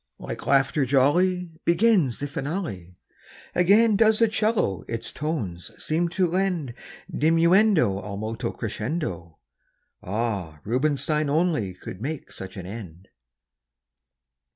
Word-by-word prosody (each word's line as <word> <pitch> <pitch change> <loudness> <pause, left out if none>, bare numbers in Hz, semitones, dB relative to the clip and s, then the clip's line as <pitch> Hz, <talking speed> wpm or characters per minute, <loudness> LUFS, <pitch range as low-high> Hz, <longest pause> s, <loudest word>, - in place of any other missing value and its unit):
Like - - -7
laughter 140 +1 +3
jolly 170 +7 +2
Begins 170 - +3
the 145 - -3
finale; 135 - -5 0.6
Again 205 +5 +5
does 220 +1 +4
the 230 - +4
'cello 215 - 0
its 115 0 -4
tones 120 - -4
seem 170 +2 0
to 185 +2 +1
lend 175 -7 -1 0.4
Diminuendo 165 - +4
ad 100 0 -6
molto 115 +3 -3
crescendo. 105 - -4 0.6
Ah! 100 -7 -3
Rubinstein 145 +4 0
only 150 - +1
could 90 +1 -9
make 150 +4 -5
such 95 0 -8
an 95 - -6
end! 95 -3 -9
140 Hz, 110 wpm, -25 LUFS, 105-175 Hz, 0.6 s, Again